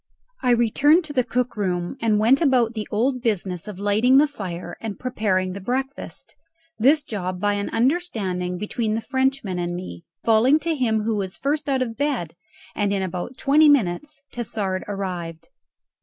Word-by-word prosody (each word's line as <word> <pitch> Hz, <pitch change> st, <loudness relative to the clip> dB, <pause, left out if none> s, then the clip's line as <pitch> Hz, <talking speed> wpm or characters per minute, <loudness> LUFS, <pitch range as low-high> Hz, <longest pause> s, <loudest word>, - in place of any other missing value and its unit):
I 250 Hz, -, +1 dB
returned 260 Hz, +8 st, +4 dB
to 300 Hz, -2 st, -5 dB
the 255 Hz, -3 st, +2 dB
cook 250 Hz, +1 st, -1 dB
room 180 Hz, -1 st, -2 dB
and 220 Hz, -2 st, +2 dB
went 235 Hz, +7 st, +4 dB
about 250 Hz, -6 st, +3 dB
the 215 Hz, -2 st, -4 dB
old 250 Hz, +4 st, 0 dB
business 195 Hz, -6 st, -1 dB
of 210 Hz, -3 st, -7 dB
lighting 210 Hz, +6 st, +3 dB
the 290 Hz, -, +6 dB
fire 190 Hz, -, -6 dB
and 220 Hz, -3 st, -5 dB
preparing 190 Hz, -7 st, 0 dB
the 200 Hz, -, -7 dB
breakfast 265 Hz, +6 st, -4 dB, 0.5 s
this 285 Hz, +6 st, +4 dB
job 185 Hz, -4 st, -4 dB
by 205 Hz, +2 st, +1 dB
an 200 Hz, 0 st, -2 dB
understanding 220 Hz, -, 0 dB
between 215 Hz, +2 st, -2 dB
the 225 Hz, -, -2 dB
Frenchman 260 Hz, -7 st, -1 dB
and 175 Hz, 0 st, -2 dB
me, 85 Hz, -, -8 dB, 0.2 s
falling 230 Hz, +6 st, +5 dB
to 330 Hz, +1 st, 0 dB
him 230 Hz, -7 st, +1 dB
who 220 Hz, 0 st, 0 dB
was 190 Hz, -2 st, -4 dB
first 290 Hz, +1 st, -1 dB
out 265 Hz, -2 st, +2 dB
of 230 Hz, -2 st, -6 dB
bed 255 Hz, -, -1 dB, 0.4 s
and 205 Hz, -1 st, 0 dB
in 195 Hz, -1 st, 0 dB
about 185 Hz, +7 st, -5 dB
twenty 300 Hz, +2 st, +5 dB
minutes 275 Hz, +3 st, +1 dB
Tassard 200 Hz, -5 st, -3 dB
arrived. 180 Hz, -5 st, -5 dB
220 Hz, 170 wpm, -23 LUFS, 190-265 Hz, 0.5 s, the